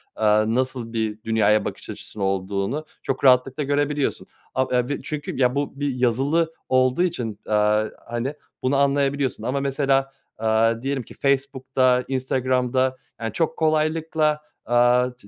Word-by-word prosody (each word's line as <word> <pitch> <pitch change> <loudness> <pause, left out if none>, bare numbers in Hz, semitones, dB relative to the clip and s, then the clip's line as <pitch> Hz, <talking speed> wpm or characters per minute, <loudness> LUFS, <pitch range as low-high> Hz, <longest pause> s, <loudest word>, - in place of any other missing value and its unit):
aaa, 110 0 +3
nasıl 125 0 -1
bir 110 -1 -2
dünyaya 110 -2 +2
bakış - - -6
açısı 105 - -8
olduğunu 100 +8 -1 0.2
çok 135 0 -3
rahatlıkla 130 +2 +4
görebiliyorsun. 145 0 -1 0.3
Ab 130 -1 +1
e 125 +1 0
b 145 - -2
çünkü, 150 -1 -5
ya, 125 -1 +2
bu 140 0 -3
bir 145 -2 -1
yazılı 135 +7 +1 0.2
olduğu 130 +5 +3
için, 120 - -3
aaa, 105 0 +3 0.2
hani, 120 +4 -2 0.3
bunu 130 +2 +2
anlayabiliyorsun 140 -1 +1
ama 135 +2 -1
mesela, 135 -1 +1 0.2
aaa, 115 +1 +2
diyelim 135 0 -2
ki - - -13
Facebook'ta, 130 -2 +1
Instagram'da, 130 0 0 0.2
ya, 115 - -1
çok 160 +4 -1
kolaylıkla, 155 -1 +1 0.2
aaa, 120 +1 +4
çı 115 - -19
130 Hz, 140 wpm, -23 LUFS, 115-140 Hz, 0.3 s, rahatlıkla